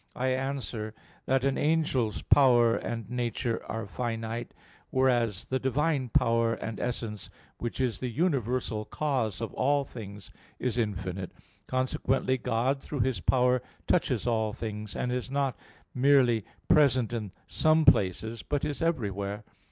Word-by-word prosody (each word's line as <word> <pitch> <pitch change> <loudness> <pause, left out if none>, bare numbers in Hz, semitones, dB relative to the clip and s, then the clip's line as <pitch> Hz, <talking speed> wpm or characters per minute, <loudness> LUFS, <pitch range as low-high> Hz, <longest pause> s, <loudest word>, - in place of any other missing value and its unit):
I 130 +1 0
answer 130 -5 -3 0.3
that, 135 -1 +2
An 135 0 +1
angel's 145 -9 +1
power 120 -4 +5
and 115 -3 -4
nature 120 -1 -2
are 115 -1 -3
finite, 115 +1 -4 0.4
whereas 120 -6 +2
the 130 - -2
Divine 135 0 0
power 115 -1 +2
and 115 -1 -5
essence, 115 -4 -4 0.3
which 120 +2 -4
is 125 -6 0
the 125 - -2
universal 125 - 0
cause 115 -6 -1
of - - -4
all 140 +1 +2
things, 105 -6 -9 0.3
is 125 -1 -1
infinite: 95 -4 -2 0.4
consequently 130 0 0
God 130 +5 0
through 145 -2 -3
His 130 0 0
power 125 -1 +3 0.2
touches - - +1
all 110 -3 +1
things, 105 -2 -5
and 125 - -1
is 125 0 -2
not 135 -1 0 0.4
merely 125 -5 +4 0.2
present 130 -6 +4
in 105 -4 -3
some 155 0 +3
places, 105 +4 +3
but 145 +9 -1
is 150 -2 -3
everywhere. 105 - -1
120 Hz, 135 wpm, -29 LUFS, 110-135 Hz, 0.4 s, power